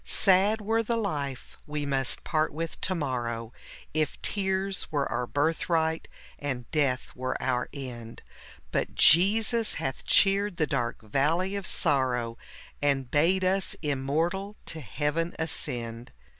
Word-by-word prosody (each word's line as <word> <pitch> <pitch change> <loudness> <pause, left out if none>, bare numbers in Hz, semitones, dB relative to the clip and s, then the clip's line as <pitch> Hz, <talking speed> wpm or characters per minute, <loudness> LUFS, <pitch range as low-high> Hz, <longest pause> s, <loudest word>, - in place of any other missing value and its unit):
Sad 200 +3 +3
were 225 +2 +1
the 230 +1 -1
life 145 - -4
we 150 -1 -3
must 135 -2 0
part 155 -1 0
with 165 +2 -5
to 185 - +1
morrow, 120 -6 -3 0.4
If 155 -1 -1
tears 190 -1 0
were 145 -2 0
our 125 - -1
birthright, 160 +2 0 0.3
and 130 -4 -3
death 140 -5 0
were 130 +1 -3
our 125 -1 -1
end; 120 -5 -8 0.5
But - - -1
Jesus 215 +6 +5
hath 135 0 -4
cheered 200 -1 +3
the 155 - +2
dark 120 -6 -2
valley 160 - +1
of 200 -1 -3
sorrow, 125 -6 +1 0.4
And 135 -3 0
bade 175 +6 +3
us 190 +1 +2
immortal 160 +8 -1
to 160 - -6
Heaven 150 - -2
ascend. 120 -7 -3
150 Hz, 130 wpm, -28 LUFS, 130-185 Hz, 0.5 s, Jesus